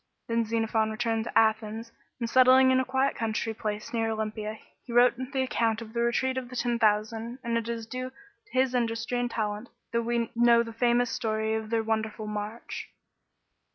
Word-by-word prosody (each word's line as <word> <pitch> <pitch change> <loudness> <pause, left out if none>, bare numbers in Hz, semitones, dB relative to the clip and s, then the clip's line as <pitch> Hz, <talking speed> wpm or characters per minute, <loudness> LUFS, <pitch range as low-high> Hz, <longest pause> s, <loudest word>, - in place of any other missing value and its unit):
Then 230 0 +1
Xerophon 225 0 +1
returned 225 0 -1
to - - -1
Athens, 220 +1 +1 0.3
and 235 - -1
settling 260 +2 +6
in 260 - +4
a - - +2
quiet 265 +2 +1
country 225 0 -2
place 215 -1 -4
near 225 -1 +1
Olympia, 215 0 -3 0.3
he 245 - -10
wrote 245 +1 +6
the 260 +1 -2
account 225 -3 0
of 225 -1 -9
the 235 - 0
Retreat 260 +2 +1
of 250 -2 -9
the 250 - -9
Ten 240 -1 0
Thousand, 220 +2 +1
and 235 -1 -1
it 230 0 -1
is 230 -1 -3
due 255 +2 -5
to 410 +9 -25
his 255 0 +2
industry 235 0 -1
and 245 0 0
talent, 215 0 -3 0.2
that 235 0 +1
we 235 0 -1
know 235 0 +5
the 230 -1 -8
famous 240 +1 +2
story 220 0 -1
of 220 -1 -3
their 225 -1 +1
wonderful 220 -1 -2
march. 210 +2 -5
230 Hz, 190 wpm, -28 LUFS, 220-245 Hz, 0.3 s, settling